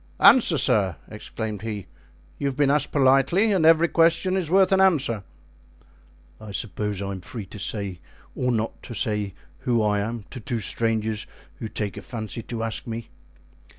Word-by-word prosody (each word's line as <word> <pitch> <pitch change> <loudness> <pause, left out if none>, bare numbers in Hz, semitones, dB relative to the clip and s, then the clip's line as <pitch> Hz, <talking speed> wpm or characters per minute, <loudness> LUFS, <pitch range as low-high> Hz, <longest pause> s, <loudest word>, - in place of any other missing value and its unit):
"Answer, 200 -11 +7
sir," 100 - +2
exclaimed 110 -3 -5
he; 105 -3 -5 0.5
"you 140 - -1
have 135 -1 -3
been 145 -2 +3
asked 150 -1 +1
politely, 140 +10 +4
and 175 -5 +3
every 165 +1 +6
question 170 +3 +3
is 180 -5 -1
worth 190 +1 +4
an 190 0 +4
answer." 140 - +2 1.2
"I 110 -2 -9
suppose 105 -1 -3
I 100 - -3
am 95 -2 -6
free 110 +2 -7
to 100 +3 -11
say 100 -3 -3 0.3
or 125 0 0
not 115 -1 -2
to 120 - -8
say 105 -3 -1 0.2
who 120 -3 +1
I 105 -1 +2
am 110 +1 -4
to 125 - -7
two 120 0 -3
strangers 110 0 -1 0.3
who 115 - -5
take 105 -2 -4
a - - -6
fancy 115 -1 -6
to 115 0 -5
ask 115 +1 -4
me." 115 0 -6
115 Hz, 175 wpm, -24 LUFS, 105-145 Hz, 1.2 s, Answer